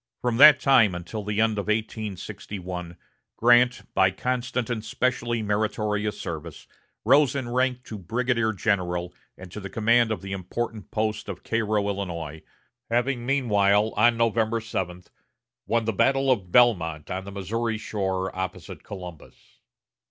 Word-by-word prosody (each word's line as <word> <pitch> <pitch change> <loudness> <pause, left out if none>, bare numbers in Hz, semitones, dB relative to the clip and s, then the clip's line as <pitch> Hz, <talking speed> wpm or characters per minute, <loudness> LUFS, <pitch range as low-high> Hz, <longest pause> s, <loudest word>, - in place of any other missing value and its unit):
From 120 -2 -1
that 145 +1 +9
time 120 -10 +4
until 90 +5 -6
the 105 +1 -2
end 110 -2 +2
of 100 - -4
1861, 100 -4 -4 0.4
Grant, 120 +2 +4
by 95 - +4
constant 125 +3 -2
and 110 -3 -3
specially 120 0 -1
meritorious 105 0 -1
service, 80 -1 -7 0.4
rose 145 -2 +4
in 130 -3 -3
rank 125 0 0
to 110 -4 -8
brigadier 115 +4 0
general 90 -4 -1 0.2
and 90 -1 -11
to 105 - -7
the 100 -1 -7
command 115 +2 +3
of 100 -5 -3
the 95 - -6
important 105 +3 -4
post 110 -1 -2
of 95 -2 -7
Cairo, 110 -2 0
Illinois, 85 -6 -4 0.5
having 120 +1 0
meanwhile, 105 -6 +2
on 115 +2 +4
November 115 0 +1
7, 90 -5 -4 0.6
won 115 -1 +1
the 110 - 0
battle 135 +5 +2
of 95 -8 -1
Belmont 90 -11 +3
on 95 +1 -3
the 100 - -9
Missouri 110 +4 -2
shore 95 -3 -3
opposite 95 0 -6
Columbus. 90 -5 -11
110 Hz, 145 wpm, -25 LUFS, 95-120 Hz, 0.6 s, that